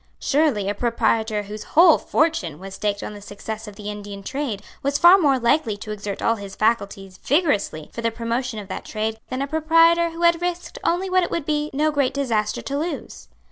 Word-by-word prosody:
Surely 280 -9 +1
a 205 - 0
proprietor 220 -1 0
whose 210 +1 -7
whole 335 -1 +8
fortune 300 - 0
was 190 +3 -9
staked 205 0 -2
on - - -5
the 205 - -10
success 215 +2 -7
of 210 - -9
the 210 0 -6
Indian 205 -1 -8
trade 255 -4 -4 0.2
was 280 +1 0
far 345 +4 +8
more 280 -6 +3
likely 235 -3 +1
to 215 +1 -7
exert 205 -1 -5
all 230 - +2
his 200 -1 -8
faculties 200 -4 -1
vigorously 265 - 0
for 235 - -5
the 230 - +1
promotion 235 +1 -3
of 205 -2 -7
that 190 - -6
trade 220 0 -3
than 255 +2 -2
a - - -3
proprietor 330 +2 +4
who 335 +1 -6
had 340 0 +4
risked 355 0 -4
only 355 +3 +1
what 370 0 +3
it 345 - -1
would 335 -4 -2
be 300 0 -1
no 305 +3 +1
great 280 -3 0
disaster 225 -7 -1
to 280 +1 -3
lose. 335 +2 -5
235 Hz, 210 wpm, -22 LUFS, 210-310 Hz, 0.2 s, whole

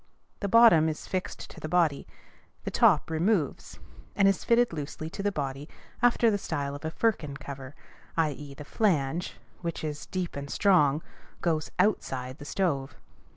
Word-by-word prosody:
The 200 - -2
bottom 190 -8 +7
is 155 - -5
fixed 185 -1 -4
to - - -11
the 155 - -5
body; 165 -5 +2 0.6
the - - -4
top - - +4
removes, 165 -1 0 0.4
and 195 - +4
is 195 -2 +2
fitted 235 -3 +3
loosely 155 +1 -5
to - - -5
the 205 +1 +1
body 140 -2 -4 0.3
after 240 -2 +4
the 205 - 0
style 145 -6 -3
of 145 - -8
a 160 - -1
firkin 160 -7 -1
cover, 135 0 -8 0.4
i.e., 145 -3 -1
the 150 - -9
flange, 170 -4 0 0.2
which 170 -3 -4
is 150 -1 -4
deep 185 -2 -3
and 140 0 -6
strong, 155 -5 +3 0.4
goes 160 -3 0
outside 135 -9 0
the 145 - -9
stove. 140 -7 -1
160 Hz, 160 wpm, -28 LUFS, 140-190 Hz, 0.6 s, bottom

